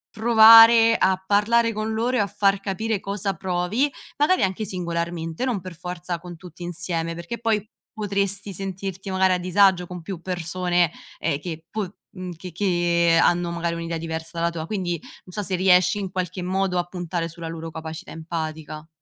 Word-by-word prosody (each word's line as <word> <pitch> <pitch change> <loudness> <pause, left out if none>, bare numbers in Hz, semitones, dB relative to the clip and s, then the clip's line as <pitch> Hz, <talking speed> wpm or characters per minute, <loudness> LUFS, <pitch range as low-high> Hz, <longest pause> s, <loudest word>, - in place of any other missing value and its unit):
provare 225 0 +8
a 190 0 +2
parlare 230 +3 +3
con 215 +1 -3
loro 235 +3 0
e - - +2
a 200 - 0
far 200 0 +1
capire 205 +2 -2
cosa 200 0 -2
provi, 190 - 0 0.3
magari 310 +6 +3
anche 190 +3 -1
singolarmente, 170 -1 -3
non 250 -6 0
per 185 -1 -9
forza 180 0 -5
con 175 -1 -9
tutti 175 0 -11
insieme, 170 -1 -3
perché 170 +7 -6
poi 220 -2 -1 0.2
potresti 200 -1 -2
sentirti 195 +1 -5
magari 190 0 +3
a - - +2
disagio 185 0 +3
con 180 0 -7
più 175 0 -7
persone, 175 0 0 0.3
ehm, 140 - -1
che 165 0 -7
po 205 -3 -4 0.2
mhmm, 185 -1 -7
che 180 0 -9
che 170 -2 +2
hanno 175 0 +2
magari 170 0 -2
un'idea 165 0 -3
diversa 160 0 -5
dalla 170 0 +1
tua, 165 -2 -5
quindi 180 -2 -2 0.3
non 180 - -14
so 210 - -2
se 190 -1 -1
riesci, 180 +1 +4
in 195 -2 -4
qualche 185 0 -3
modo, 185 0 0
a 175 - 0
puntare 175 -1 -4
sulla 165 0 -8
loro 165 0 -6
capacità 160 +1 -7
empatica. 160 -1 -6
180 Hz, 175 wpm, -23 LUFS, 170-200 Hz, 0.3 s, provare